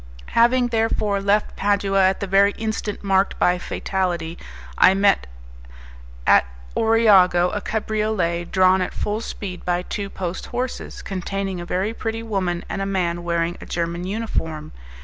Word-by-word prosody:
Having, 245 +1 +4
therefore, 220 -3 0
left 205 +1 +1
Padua 200 -1 +1
at 190 - -3
the - - -1
very 200 +1 +4
instant 220 -2 -4
marked 195 0 +2
by 180 0 +2
fatality, 175 -3 -2 0.4
I 185 - +6
met 195 - +3 1.0
at - - +5 0.3
Oriago 195 -6 +4
a 205 - -2
cabriolet, 210 -6 -1
drawn 185 0 +4
at 180 - -3
full 210 +1 -2
speed 190 -5 -6
by 175 0 0
two 200 +1 -4
post 185 -2 -5
horses, 250 +1 -5
containing 195 -1 -3
a 175 - -8
very 195 +5 -1
pretty 225 0 -4
woman 185 -5 -2
and 195 - -4
a - - -1
man 175 -3 -1
wearing 170 0 -1
a - - -10
German 170 0 -2
uniform. 175 -7 -3
195 Hz, 150 wpm, -22 LUFS, 180-210 Hz, 1.0 s, I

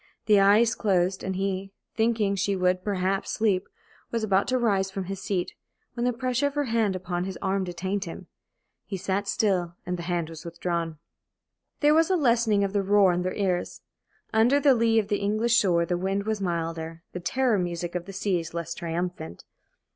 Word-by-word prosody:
The 210 -2 +5
eyes 210 +4 +5
closed, 185 -3 +1
and 190 0 -2
he, 195 0 -2 0.2
thinking 220 -3 +1
she 200 +1 0
would 185 0 +1
perhaps 195 -1 -1
sleep, 200 -4 +1 0.4
was 230 -1 -2
about 195 -2 +2
to 255 - +1
rise 200 -5 +1
from 195 0 -4
his 195 +1 -6
seat, 185 -3 -2 0.4
when 240 0 -2
the 250 - +3
pressure 255 +2 0
of 285 - -6
her 290 - +1
hand 225 -6 +1
upon 180 -1 -3
his 190 -2 -5
arm 195 0 0
detained 185 +3 -3
him. 175 +2 -8 0.6
He 195 -1 -4
sat 195 +2 -2
still 180 -5 0
and 180 0 -3
the 170 +1 -5
hand 175 -2 0
was 160 -1 -9
withdrawn. 170 -1 -3 0.8
There 295 0 +5
was 325 +2 +4
a 375 - +3
lessening 230 - +3
of 195 0 -1
the 200 - +2
roar 195 -1 +4
in 175 - 0
their 185 +1 -2
ears. 185 -3 -1 0.5
Under 240 +6 +4
the 280 -2 +5
lee 230 -2 +2
of 215 -2 +2
the 205 - +1
English 215 +3 +1
shore 170 -4 +2
the 175 +1 -1
wind 195 +2 -1
was 215 -1 -2
milder, 165 -2 -3
the 180 - -5
"terror 245 +3 +1
music" 175 -1 -3
of 175 -1 -3
the 195 - -9
sea 190 -3 0
less 170 0 -3
triumphant. 170 - -5
195 Hz, 195 wpm, -26 LUFS, 180-220 Hz, 0.8 s, The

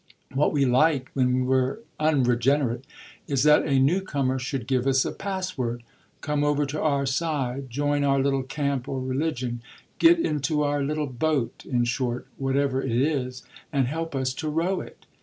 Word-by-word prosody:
What 140 +3 +2
we 140 -2 +2
like, 130 +1 +2
when 125 -1 +2
we're 130 +3 +1 0.2
unregenerate, 130 -3 +2 0.4
is 140 -3 +1
that 150 0 +5
a 140 -2 +2
new 145 +9 +3
comer 135 -7 -1
should 130 -1 -3
give 130 0 0
us 135 -1 +3
a - - -2
password, 185 -12 -3 0.4
come 150 -1 0
over 145 0 +2
to 145 +2 -4
our 140 -3 +1
side, 135 -2 -2
join 145 +3 0
our 140 -1 +3
little 135 0 +1
camp 140 -1 -2
or 135 - -2
religion, 130 -2 -2 0.4
get 340 +1 +7
into 150 - 0
our 145 0 0
little 150 +2 -1
boat, 135 0 -1
in 120 -2 +2
short, 120 0 -2
whatever 135 0 +1
it - - -3
is, 130 -3 -1 0.3
and 140 -4 +2
help 160 +3 -3
us 130 -1 0
to 155 +3 -4
row 170 +5 0
it. - - -13
140 Hz, 170 wpm, -25 LUFS, 130-150 Hz, 0.4 s, get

